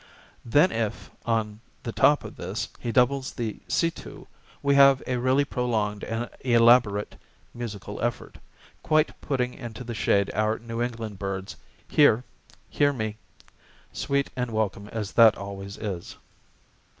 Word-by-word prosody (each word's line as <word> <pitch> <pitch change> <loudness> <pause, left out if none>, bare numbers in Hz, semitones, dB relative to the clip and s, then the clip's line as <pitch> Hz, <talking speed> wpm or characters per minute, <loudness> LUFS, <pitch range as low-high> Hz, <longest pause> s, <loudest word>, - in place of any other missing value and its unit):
Then 145 +10 +4
if, 115 -2 -3 0.2
on 110 -2 0 0.2
the - - -3
top - - +4
of - - -9
this, - - -4
he 120 - -3
doubles 130 +2 +2
the 115 -4 -4
see 165 -1 +1
too, - - -11 0.4
we 140 0 +3
have 140 -1 +6
a 125 - -1
really 130 +3 +2
prolonged 110 -6 -1
and 115 +2 -3
elaborate 115 -4 +4 0.4
musical 105 -4 -6
effort, 120 0 -3 0.4
quite 155 0 +1
putting 125 -3 -1
into 120 -2 -8
the 120 -1 -5
shade 100 -2 +1
our 110 +1 +1
New 115 0 -5
England 115 -4 -4
bird's 95 -1 -4 0.3
hear, 125 -5 +4 0.4
hear 145 0 +2
me, 110 -4 -4 0.8
sweet 140 0 -1
and 125 -1 -2
welcome 105 -2 -2
as 105 -2 -4
that 115 -2 +6
always 100 0 -7
is. 95 -5 -5
115 Hz, 140 wpm, -26 LUFS, 105-125 Hz, 0.8 s, have